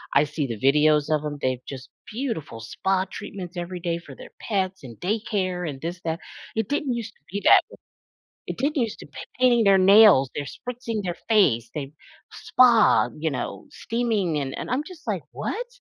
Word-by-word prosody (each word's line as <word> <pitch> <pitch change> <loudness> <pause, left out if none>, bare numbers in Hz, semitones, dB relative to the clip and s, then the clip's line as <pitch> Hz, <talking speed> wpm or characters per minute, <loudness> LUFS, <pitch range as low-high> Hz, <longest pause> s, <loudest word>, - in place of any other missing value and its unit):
I - - +6
see 150 -1 -3
the 115 -3 -5
videos 150 +2 +3
of 150 - -2
them, 150 -1 -4
they've 130 -1 -1
just 130 -2 -8 0.2
beautiful 215 - -4
spa 190 +11 -1
treatments 180 -3 -8
every 175 +1 -5
day 170 -1 -2
for - - -12
their - - -12
pets, 190 -5 -2
and 115 -4 -10
daycare, 185 -4 -2
and 135 -2 -7
this 175 +2 -5
that, 165 +1 -2 0.4
it 220 -3 -1
didn't 285 -3 -1
used 225 -2 -5
to - - -35
be 200 0 -3
that - - +8
w - - -14 0.7
it - - -5
didn't 285 -1 +1
used 225 - -3
to - - -11 0.3
painting 240 -2 +5
their 195 -1 +6
nails, 195 - +7
they're 145 - -3
spritzing 235 -3 -5
their 175 -1 -2
face, 120 - +3
they 140 -1 -5 0.4
spa, 240 -4 +4
you 160 +1 -1
know, 135 - -5
steaming, 220 -9 -1
and 135 -2 -4
and - - -5
I'm 260 +4 0
just 360 -2 -13
like, - - -2
"What?" - - -4
185 Hz, 190 wpm, -24 LUFS, 150-225 Hz, 0.7 s, that